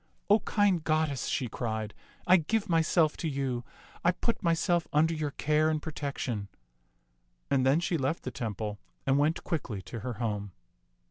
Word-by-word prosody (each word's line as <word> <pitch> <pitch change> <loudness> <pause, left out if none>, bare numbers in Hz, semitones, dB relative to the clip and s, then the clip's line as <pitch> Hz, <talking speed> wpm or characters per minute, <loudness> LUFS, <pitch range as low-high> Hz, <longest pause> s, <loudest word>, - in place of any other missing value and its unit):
" - - -42
O 210 - +7
kind 200 -5 +2
goddess," 155 -4 +1
she 125 - 0
cried, 110 -2 -3 0.2
" - - -28
I 185 +1 +7
give 215 +6 0
myself 165 -2 +3
to 165 - -2
you. 135 -4 -2 0.4
I 175 - +5
put 230 +5 -2
myself 170 -1 +2
under 160 +2 +3
your 155 -2 -1
care 155 +2 +2
and 155 -1 +1
protection"; 140 -9 -3 1.0
and 130 -1 +3
then 140 +4 +5
she 170 -1 0
left 135 +5 -1
the 130 - -4
temple 105 -3 -4 0.3
and 135 +1 +3
went 155 +3 +1
quickly 125 - -3
to 115 - -7
her 125 +3 -4
home. 105 -4 -3
150 Hz, 175 wpm, -30 LUFS, 120-165 Hz, 1.0 s, O